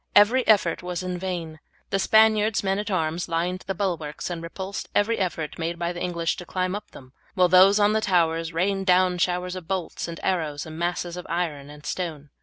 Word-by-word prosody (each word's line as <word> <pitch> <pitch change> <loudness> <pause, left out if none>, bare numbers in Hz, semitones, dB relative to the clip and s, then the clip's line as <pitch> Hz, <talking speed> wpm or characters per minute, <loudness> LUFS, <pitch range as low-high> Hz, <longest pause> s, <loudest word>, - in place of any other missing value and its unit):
Every 235 +5 +5
effort 195 -6 +3
was 180 0 -4
in 180 -1 -3
vain. 170 -4 -4 0.3
The 195 - +1
Spaniard's 220 +1 +4
men 195 0 0
at 210 +1 -3
arms 170 -2 -1
lined 175 +2 -1
the 195 - -2
bulwarks, 170 -4 -3
and 170 -1 -4
repulsed 190 +4 -6
every 220 +3 +2
effort 165 -6 -3
made 170 +1 -2
by 170 +1 -2
the 175 - -7
English 170 -2 -1
to 180 - -8
climb 185 0 -1
up 205 - -6
them, 130 0 -14 0.2
while 180 -2 +5
those 190 +3 +7
on 205 +1 +4
the 220 - +1
towers 165 -4 +1
rained 195 +3 0
down 180 0 +4
showers 180 +1 0
of 180 -3 -8
bolts 185 -3 -3
and 170 -1 -7
arrows 155 -6 -1
and 160 0 -8
masses 175 0 -2
of 180 - -7
iron 160 -5 -2
and 150 0 -13
stone. 150 -3 -4
180 Hz, 210 wpm, -25 LUFS, 165-190 Hz, 0.3 s, those